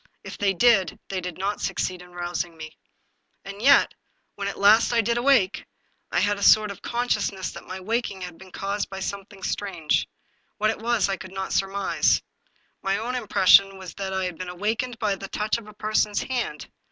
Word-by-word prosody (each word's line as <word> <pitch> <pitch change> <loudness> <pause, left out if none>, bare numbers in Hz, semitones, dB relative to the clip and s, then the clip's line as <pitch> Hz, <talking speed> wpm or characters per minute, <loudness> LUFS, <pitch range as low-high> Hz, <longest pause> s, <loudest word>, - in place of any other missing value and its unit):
If - - -8
they 195 -1 +1
did, 195 -4 +4
they 190 -1 -2
did 180 -2 -6
not 200 +2 -2
succeed 180 -1 -2
in 180 0 -14
rousing 175 -1 -4
me. 155 0 -9 0.7
And 200 +1 -8
yet, 275 +3 +6 0.4
when 200 0 -4
at 200 - -4
last 215 +4 +5
I 235 - +3
did 235 +2 0
awake, 240 -6 +3 0.5
I - - +2
had 205 0 +1
a - - -8
sort 215 +1 +6
of 200 - -10
con 240 +1 -2
sciousness 200 -4 -1
that - - -11
my 185 - -6
waking 210 -1 -2
had 180 -2 -8
been 190 0 -13
caused 200 +2 -3
by 195 - -6
something 195 0 -6
strange. 180 -7 -1 0.5
What 215 +1 +2
it - - -6
was 230 -3 +1
I 195 -1 -1
could 185 - -10
not 190 0 -3
surmise. 195 0 +1 0.6
My 195 0 0
own 235 +4 -3
im 245 -4 -3
pression 195 +1 +6
was 190 -2 -9
that 195 -1 -4
I 190 0 -1
had 180 -3 -5
been 185 -1 -5
awakened 225 +7 -2
by 215 -3 0
the 195 0 -6
touch 215 +3 -1
of 220 - -14
a 210 - -11
person's 215 0 0
hand. 240 - -3
200 Hz, 205 wpm, -25 LUFS, 185-215 Hz, 0.7 s, yet